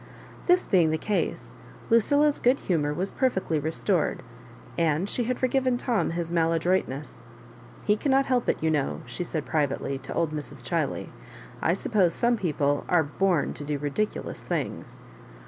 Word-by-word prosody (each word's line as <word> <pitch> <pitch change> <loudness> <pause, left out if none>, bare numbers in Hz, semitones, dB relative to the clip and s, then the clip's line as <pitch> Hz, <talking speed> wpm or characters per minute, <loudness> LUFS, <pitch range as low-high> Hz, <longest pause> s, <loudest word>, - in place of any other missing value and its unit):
This 360 +1 +4
being 175 -5 +4
the 160 - +1
case, 205 +5 -2 0.4
Lucilla's 285 +6 +4
good 250 +3 +3
humour 150 -5 0
was 180 +6 -2
perfectly 190 - 0
restored, 160 +2 0 0.5
and 165 +2 +1
she 240 +3 0
had 250 +1 -1
forgiven 255 -1 +1
Tom 240 -3 0
his 170 0 -3
mal 165 -1 +2
adroitness. 165 -4 -1 0.3
" - - -20
He 210 - +4
cannot 270 +2 +2
help 250 -2 +1
it, - - +2
you 160 - +3
know," 145 -3 -1
she 125 +8 -4
said 160 -3 -4
privately 140 -3 -1
to 130 - -7
old 165 -2 +1
Mrs. 150 -2 -6
Chiley: - - -1 0.3
*' - - -16
I 170 - +2
suppose 190 -3 +1
some 240 0 +2
people 145 -8 0
are 175 -3 +4
born 175 +2 0
to - - -6
do 145 0 -2
ridiculous 145 +9 -3
things." - - -4
175 Hz, 165 wpm, -26 LUFS, 155-235 Hz, 0.5 s, This